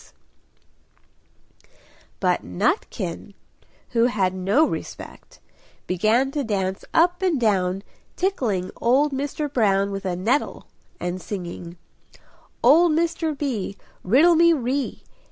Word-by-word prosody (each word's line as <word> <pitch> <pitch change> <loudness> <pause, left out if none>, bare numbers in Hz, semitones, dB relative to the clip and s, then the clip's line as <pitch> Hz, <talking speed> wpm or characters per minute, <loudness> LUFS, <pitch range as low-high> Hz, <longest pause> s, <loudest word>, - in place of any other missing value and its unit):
But - - +1
Nutkin, 195 0 -2 0.5
who 235 -1 +3
had 195 -6 0
no 195 +11 +2
respect, - - -7 0.5
began 220 +9 +1
to 290 0 -2
dance 195 -4 -2
up 350 +2 +3
and 360 -7 +1
down, 195 -4 +1 0.3
tickling 225 - -1
old 275 +5 +3
Mr. 285 +2 -2
Brown 200 -4 +2
with 195 0 -5
a 180 -2 -1
nettle 225 +11 -1 0.3
and 180 +1 -3
singing 175 -3 -7 0.9
"Old 335 +2 +6
Mr. 325 -2 0
B! 230 -9 -3 0.3
Riddle 285 - +5
me 335 +1 +5
ree! 270 -1 -2
230 Hz, 105 wpm, -23 LUFS, 190-295 Hz, 0.9 s, Old